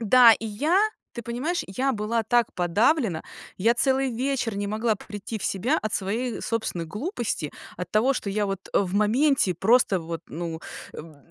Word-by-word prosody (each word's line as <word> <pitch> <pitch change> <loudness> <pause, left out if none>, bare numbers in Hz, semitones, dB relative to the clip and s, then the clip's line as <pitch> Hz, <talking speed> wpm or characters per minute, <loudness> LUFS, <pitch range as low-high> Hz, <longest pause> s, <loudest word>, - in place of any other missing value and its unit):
Да, 235 +1 +7
и 225 - -2
я, 295 - +1 0.3
ты 235 - -6
понимаешь, 255 +10 -2
я 260 +8 0
была 225 +1 -1
так 235 +1 +2
подавлена, 185 - +2 0.3
я 225 +5 +3
целый 265 +1 +2
вечер 245 -3 -1
не 205 - -2
могла 220 +2 0
прийти 210 +2 -7
в - - -7
себя 240 - +1
от 215 - -3
своей 225 +5 -2
собственной 220 -7 -2
глупости. 215 - -3 0.3
От 180 - -5
того, 235 +6 +3
что 230 - -4
я 205 +1 0
вот, 195 -1 -5
э, - - +6
в 190 -2 -1
моменте 220 - +3
просто 200 +1 +3
вот, 165 0 -5
ну, 165 0 -5 0.3
м, 155 -1 -10
220 Hz, 175 wpm, -25 LUFS, 195-250 Hz, 0.3 s, Да